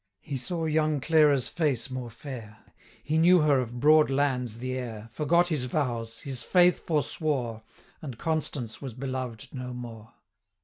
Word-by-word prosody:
He 145 - -5
saw 165 +5 -1
young 155 -1 +1
Clara's 145 -3 +4
face 140 -7 0
more 130 -2 -5
fair, 115 -3 -10 0.4
He 155 +1 +1
knew 175 +1 +6
her 145 -3 +4
of 120 -1 -4
broad 155 +2 +5
lands 130 -4 0
the 130 +2 -4
heir, 115 -3 -6
510 - - -31
Forgot 170 +6 +3
his 150 -6 0
vows, 120 -4 -2
his 130 -3 -6
faith 180 +6 +3
forswore, 145 -7 -1 0.4
And 135 -7 -7
Constance 150 -7 -3
was 130 -5 -6
beloved 130 -1 -5
no 125 -1 -6
more. 115 -2 -9
135 Hz, 160 wpm, -27 LUFS, 120-155 Hz, 0.4 s, knew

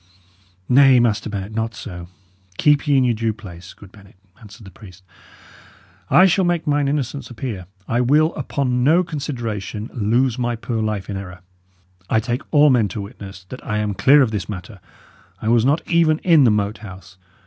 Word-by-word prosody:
"Nay, 135 0 +6
Master 115 -2 0
Bennet, 100 0 -5
not 115 +1 -3
so. 85 -4 -8 0.5
Keep 150 0 +2
ye 145 -2 +3
in 130 - +3
your 120 -1 +2
due 115 0 -2
place, 95 -5 -12
good 100 -2 -15
Bennet," 100 -2 -18 0.2
answered 110 +1 -14
the 95 - -12
priest. 95 -1 -15 1.1
"I 185 - +6
shall 190 +1 +2
make 175 -2 0
mine 145 -1 +1
innocence 140 -1 -3
appear. 110 -7 -6 0.2
I 120 +2 0
will, 150 +6 +3
upon 130 -3 -2
no 165 +7 +4
consideration, 120 - -5
lose 120 +3 0
my 120 -1 -1
poor 115 0 -4
life 105 -3 -3
in 100 - -5
error. 90 -2 -9 0.7
I 110 - +2
take 120 +4 -3
all 150 -1 +5
men 120 -5 +3
to 105 - -6
witness 100 -2 -10
that 130 - -9
I 105 -5 -3
am 105 -1 -1
clear 140 +7 +5
of 115 - -1
this 100 -3 -4
matter. 100 +1 -8 0.6
I 110 - -3
was 120 0 +3
not 145 +4 +1
even 165 -2 +3
in 165 -6 +5
the - - +5
Moat 105 0 -1
House. 95 -3 -12
115 Hz, 185 wpm, -20 LUFS, 105-140 Hz, 1.1 s, Nay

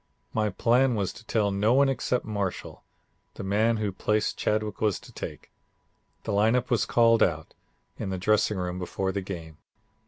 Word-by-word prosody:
My 110 -1 +1
plan 120 +5 +2
was 100 -3 -1
to 115 - -13
tell 105 -3 +1
no 105 +5 +2
one 140 +1 +5
except 125 -1 -1
Marshall, 100 -4 -4 0.5
the - - -6
man 110 +4 +2
whose 105 -3 -2
place 105 0 +1
Chadwick 105 -1 -2
was 105 -4 +1
to - - -15
take. - - -8 0.7
The - - -3
lineup 115 +5 +2
was 115 -4 +2
called 115 -1 +4
out 80 -2 +1 0.5
in - - -3
the 95 - -2
dressing 105 +2 +2
room 90 0 -3
before 95 +1 -2
the 100 - -2
game. 85 -5 -8
105 Hz, 175 wpm, -27 LUFS, 95-115 Hz, 0.7 s, one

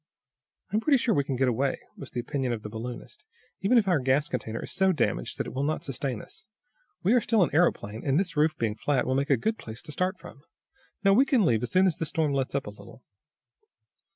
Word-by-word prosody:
"I - - -1
am - - +4
pretty 280 +2 +4
sure 235 -2 +1
we 140 - +2
can 135 -1 -3
get 130 +1 +2
away," 130 +3 0 0.2
was 140 - -9
the 125 - -4
opinion 130 0 -2
of 110 -2 -5
the 105 - -7
balloonist. 120 +2 -7 0.4
"Even 205 +7 +4
if 215 -4 +3
our 175 -5 +3
gas 130 +3 +1
container 115 -2 -4
is - - -7
so 190 0 +3
damaged - - -1
that - - -2
it - - -7
will 130 - -2
not 155 +2 -1
sustain 130 -3 -3
us, 195 - -15 0.6
we 200 - +4
are 250 - +4
still 220 -3 +3
an - - 0
aeroplane, 115 -10 +1
and 140 +2 +2
this 185 -4 -2
roof 155 +1 +2
being 115 -2 0
flat 130 +4 0
will 130 - 0
make 140 +2 0
a 140 - +4
good 220 - -1
place 110 +2 -8
to - - -8
start 185 +5 -1
from. 140 - -13 0.6
No, 195 0 +5
we 250 +7 +6
can 260 -7 +2
leave 115 -5 +2
as 125 - -2
soon 185 +1 +4
as 180 -2 +1
this 165 - -1
storm 155 -4 0
lets 135 0 -1
up 140 - -1
a 105 - -6
little." 100 +4 -15
140 Hz, 250 wpm, -27 LUFS, 125-185 Hz, 0.6 s, we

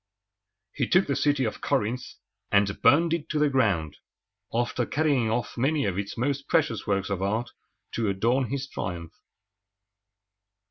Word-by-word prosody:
He - - -1
took 185 +1 +4
the 140 - -1
city 145 -2 +2
of 110 - -3
Corinth, 115 +5 0 0.5
and 100 -1 +2
burned 165 +2 +5
it 170 -3 -3
to 155 - -1
the 150 -1 +3
ground, 95 - +1 0.5
after 120 +1 0
carrying 140 -7 +1
off 115 +1 -2
many 145 +2 +1
of 100 -1 -1
its 100 0 -5
most 140 +3 -1
precious 120 - +1
works 100 -1 0
of 95 -1 -2
art 110 +5 -1 0.4
to 115 -3 -1
adorn 115 +7 +1
his 135 0 -3
triumph. 85 -8 -5
120 Hz, 150 wpm, -26 LUFS, 100-140 Hz, 0.5 s, burned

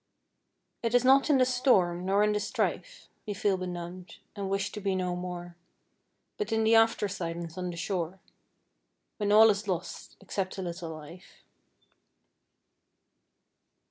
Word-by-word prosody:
It 235 +1 0
is 245 0 +4
not 270 +3 +5
in 290 - +5
the 255 - +4
storm 190 -9 +2
nor 200 +2 +3
in 210 - +3
the 210 - 0
strife - - -3 0.2
We 205 - -3
feel 195 0 +1
benumbed, 180 0 -7 0.2
and 200 -1 -4
wish 195 +1 -1
to 210 - -7
be 195 -1 0
no 180 -1 -1
more, 175 -1 -6 0.8
But 425 - -3
in 225 0 +2
the 220 +1 +4
after 225 -2 +4
silence 170 -3 -5
on 180 -1 -3
the 170 - -6
shore, 180 0 -3 1.0
When 205 -1 0
all 220 +1 +8
is 205 +1 -4
lost, 180 -2 -4
except 190 -1 -4
a 190 - -3
little 170 -1 -5
life. 160 +3 -12
190 Hz, 150 wpm, -29 LUFS, 175-215 Hz, 1.0 s, all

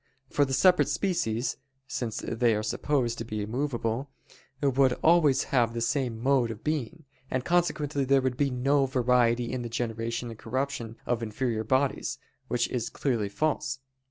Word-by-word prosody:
For 145 - +3
the 135 - -4
separate 180 +7 +5
species, 135 - -1 0.3
since 125 -6 -3
they 115 -1 +2
are 105 - -1
supposed 120 +1 0
to - - -2
be 110 -2 -4
immovable, 120 +2 -2 0.5
would 135 -2 +3
always 155 -5 +5
have 120 -3 +3
the - - -1
same 125 -2 0
mode 130 -1 +2
of 115 -1 -7
being: 155 +1 -3 0.2
and 130 0 -2
consequently 150 -5 +1
there 135 +1 +4
would 130 -1 0
be 140 +2 +1
no 135 +2 +2
variety 125 -2 +2
in 125 - -2
the 120 - -5
generation 115 0 -3
and 115 - -11
corruption 120 -2 -3
of 120 -1 0
inferior 115 0 -2
bodies: 130 +4 0 0.3
which 120 -1 +1
is 120 -1 -2
clearly 115 -7 -1
false. 135 +2 -1
125 Hz, 160 wpm, -28 LUFS, 115-140 Hz, 0.5 s, separate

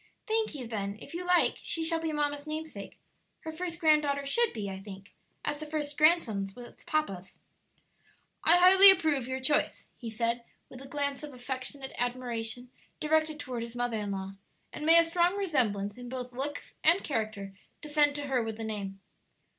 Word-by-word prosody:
"Thank 440 -6 0
you; 260 -4 -6
then, 205 -3 -4
if - - -12
you 350 +2 -4
like, 360 0 +2
she 330 - -2
shall 325 0 +1
be 325 -1 -2
mamma's 290 0 -2
namesake; 310 -10 -7 0.4
her 320 - -6
first 335 +1 -5
granddaughter 300 -4 +2
should 470 +12 +2
be, 210 -3 -5
I 190 -1 -6
think, 195 +1 -11 0.3
as 295 - -2
the 310 - -7
first 300 -1 -3
grandson 280 - +3
was 245 -1 -11
papa's." 195 - -2 1.1
"I 340 +2 +6
highly 380 +2 +10
approve 315 -9 +3
your 260 0 -3
choice," 260 +3 0
he 235 - -7
said, 235 +1 -1 0.3
with 255 - -11
a 270 - -10
glance 285 0 -2
of 295 -3 -9
affectionate 265 +2 -5
admiration 245 -1 -3 0.3
directed 310 0 +1
toward 250 -4 -5
his 235 +1 -7
mother 245 -2 -1
in 205 -1 -4
law; 195 0 -4 0.4
"and 300 - -4
may 330 +1 +8
a 335 - +8
strong 345 +2 +1
resemblance 235 - -1
in 245 0 -8
both 250 -1 -6
looks 280 +3 -5
and 340 +5 +4
character 215 -6 -3 0.3
descend 295 -1 +2
to 290 0 -4
her 265 -3 0
with 225 -1 -4
the 225 - -5
name." 200 -3 -5
275 Hz, 180 wpm, -29 LUFS, 230-315 Hz, 1.1 s, highly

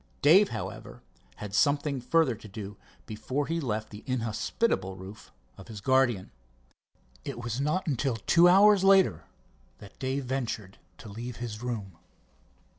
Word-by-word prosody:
Dave, 185 +8 +6
however, - - -7 0.3
had 105 -2 -8
something 140 +2 +1
further 160 +1 +2
to 110 -1 -12
do 105 0 -8 0.3
before 125 +7 -3
he 165 +2 -2
left 110 -5 -3
the 105 0 -10
inhospitable 115 - -1
roof 95 +3 -12 0.3
of - - -12
his 110 -3 -8
guardian. 120 -4 +1 0.9
It 140 -4 -6
was 120 +2 -3
not 155 +6 0
until 135 -4 -1
two 170 - +4
hours 200 +1 +6
later 195 -1 +4 0.5
that 100 -1 -15
Dave 135 0 -2
ventured 115 -7 -4 0.2
to 115 - -11
leave 115 +4 -7
his 115 -2 -6
room. 105 -8 -5
120 Hz, 140 wpm, -28 LUFS, 105-145 Hz, 0.9 s, Dave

